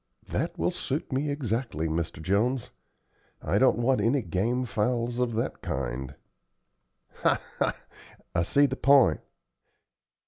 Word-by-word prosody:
"That -, -, -2 dB
will -, -, +1 dB
suit -, -, -3 dB
me 140 Hz, +3 st, 0 dB
exactly, 120 Hz, -, -2 dB
Mr. 80 Hz, +1 st, -2 dB
Jones. 110 Hz, +8 st, +1 dB, 0.7 s
I 95 Hz, +6 st, 0 dB
don't 130 Hz, -4 st, +4 dB
want 120 Hz, -1 st, +2 dB
any 120 Hz, +5 st, +2 dB
game 120 Hz, +7 st, 0 dB
fowls 120 Hz, +2 st, -1 dB
of 120 Hz, -2 st, 0 dB
that 115 Hz, -, -2 dB
kind." 65 Hz, +1 st, -4 dB, 1.0 s
"Ha, -, -, +2 dB, 0.2 s
ha! -, -, +1 dB, 0.6 s
I 85 Hz, -, +2 dB
see 140 Hz, +12 st, +3 dB
the 130 Hz, -1 st, -1 dB
p'int. 140 Hz, -1 st, +5 dB
115 Hz, 130 wpm, -27 LUFS, 90-130 Hz, 1.0 s, p'int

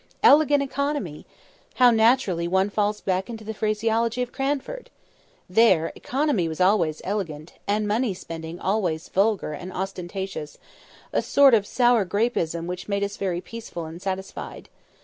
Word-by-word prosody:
"Elegant 290 Hz, -1 st, +6 dB
economy!" 280 Hz, -, -3 dB, 0.5 s
How 250 Hz, -1 st, +6 dB
naturally 220 Hz, -7 st, +3 dB
one 190 Hz, +3 st, +1 dB
falls 210 Hz, 0 st, 0 dB
back 190 Hz, +2 st, -1 dB
into 225 Hz, -2 st, -7 dB
the 220 Hz, +1 st, -5 dB
phraseology 225 Hz, +3 st, 0 dB
of 245 Hz, -, -7 dB
Cranford! 285 Hz, -, -3 dB, 0.6 s
There, 185 Hz, -4 st, +4 dB
economy 265 Hz, -, 0 dB
was 160 Hz, +1 st, -5 dB
always 180 Hz, -5 st, +2 dB
"elegant," 170 Hz, -6 st, -4 dB
and 210 Hz, +1 st, +1 dB
money 215 Hz, -1 st, 0 dB
spending 165 Hz, 0 st, -7 dB
always 180 Hz, -5 st, -1 dB
"vulgar 200 Hz, -5 st, +1 dB
and 180 Hz, +5 st, -7 dB
ostentatious"; 190 Hz, -3 st, -5 dB, 0.6 s
a -, -, +2 dB
sort 280 Hz, -2 st, +5 dB
of 205 Hz, -3 st, +3 dB
sour 240 Hz, -3 st, +3 dB
grapeism 180 Hz, -5 st, -1 dB
which 180 Hz, +3 st, -6 dB
made 200 Hz, 0 st, 0 dB
us 200 Hz, 0 st, -3 dB
very 180 Hz, -3 st, -2 dB
peaceful 220 Hz, -8 st, -7 dB
and 165 Hz, +2 st, -9 dB
satisfied. 190 Hz, 0 st, -5 dB
200 Hz, 145 wpm, -24 LUFS, 180-230 Hz, 0.6 s, Elegant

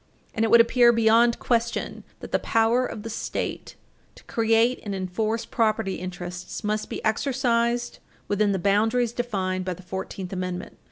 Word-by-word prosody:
And 225 Hz, -, 0 dB
it 225 Hz, -, +2 dB
would 235 Hz, -, +8 dB
appear 235 Hz, +1 st, +5 dB
beyond 230 Hz, +1 st, +4 dB
question 235 Hz, -1 st, -1 dB, 0.2 s
that -, -, -9 dB
the -, -, +2 dB
power 230 Hz, +3 st, +2 dB
of 210 Hz, -, -7 dB
the 225 Hz, -, -5 dB
State 225 Hz, -, -4 dB, 0.4 s
to -, -, -16 dB
create 230 Hz, +2 st, +2 dB
and 205 Hz, -2 st, -4 dB
enforce 215 Hz, +5 st, -2 dB
property 215 Hz, -4 st, 0 dB
interests 180 Hz, 0 st, -6 dB
must 215 Hz, 0 st, -2 dB
be -, -, -5 dB
exercised 240 Hz, 0 st, 0 dB, 0.3 s
within 205 Hz, 0 st, +1 dB
the 195 Hz, -, 0 dB
boundaries 220 Hz, +5 st, +2 dB
defined 190 Hz, -6 st, -2 dB
by 185 Hz, -1 st, -3 dB
the 185 Hz, -, -14 dB
Fourteenth 190 Hz, 0 st, -6 dB
Amendment. 185 Hz, -1 st, -5 dB
220 Hz, 160 wpm, -25 LUFS, 190-235 Hz, 0.4 s, would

